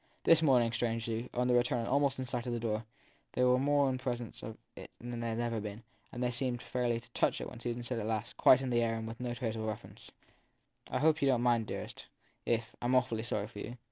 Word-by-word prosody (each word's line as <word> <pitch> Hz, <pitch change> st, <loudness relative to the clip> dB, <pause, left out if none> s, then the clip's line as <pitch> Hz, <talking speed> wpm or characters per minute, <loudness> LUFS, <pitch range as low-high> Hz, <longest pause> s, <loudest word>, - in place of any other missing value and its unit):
This 165 Hz, -1 st, +6 dB
morning, 125 Hz, -6 st, +4 dB
strangely, 115 Hz, 0 st, -1 dB
on 125 Hz, +1 st, 0 dB
the 125 Hz, -, +3 dB
return 120 Hz, 0 st, +3 dB
and 115 Hz, -, -3 dB
almost 140 Hz, 0 st, +2 dB
in 130 Hz, -, -3 dB
sight 120 Hz, -1 st, -3 dB
of 120 Hz, -, -1 dB
their 120 Hz, -, -1 dB
door, 110 Hz, -1 st, -1 dB, 0.5 s
they 125 Hz, -, +2 dB
were 125 Hz, 0 st, +5 dB
more 145 Hz, +1 st, +3 dB
in 130 Hz, -1 st, -1 dB
presence 120 Hz, -3 st, -4 dB
of 110 Hz, 0 st, -7 dB, 0.2 s
it -, -, -9 dB
than 120 Hz, 0 st, -5 dB
they 115 Hz, 0 st, -2 dB
had 115 Hz, 0 st, -2 dB
ever 120 Hz, -1 st, -1 dB
been, 105 Hz, +2 st, -6 dB, 0.3 s
and 120 Hz, -, -3 dB
they 125 Hz, -, +1 dB
seemed 120 Hz, 0 st, -1 dB
fairly 120 Hz, -2 st, 0 dB
to 120 Hz, -, -18 dB
touch -, -, +1 dB
it -, -, -4 dB
when -, -, -9 dB
Susan 120 Hz, 0 st, -3 dB
said 120 Hz, -1 st, -2 dB
at 105 Hz, -, -3 dB
last, 110 Hz, 0 st, -2 dB
quite 130 Hz, +1 st, +6 dB
in 130 Hz, -, -2 dB
the 120 Hz, -1 st, +3 dB
air 115 Hz, -1 st, +1 dB
and 110 Hz, 0 st, -4 dB
with 115 Hz, +1 st, -7 dB
no 120 Hz, -1 st, -3 dB
traceable 110 Hz, -2 st, -2 dB
reference: 110 Hz, -, -7 dB, 0.8 s
I -, -, -1 dB
hope 155 Hz, +3 st, +3 dB
you 140 Hz, -, +3 dB
don 125 Hz, -3 st, +3 dB
t -, -, -1 dB
mind, 120 Hz, -3 st, +3 dB
dearest, -, -, -6 dB, 0.4 s
if 115 Hz, -1 st, 0 dB
I -, -, -3 dB
m 125 Hz, +1 st, +3 dB
awfully 125 Hz, -3 st, +2 dB
sorry 105 Hz, -3 st, -2 dB
for 105 Hz, -1 st, -10 dB
you. 120 Hz, +4 st, -6 dB
120 Hz, 260 wpm, -33 LUFS, 115-125 Hz, 0.8 s, This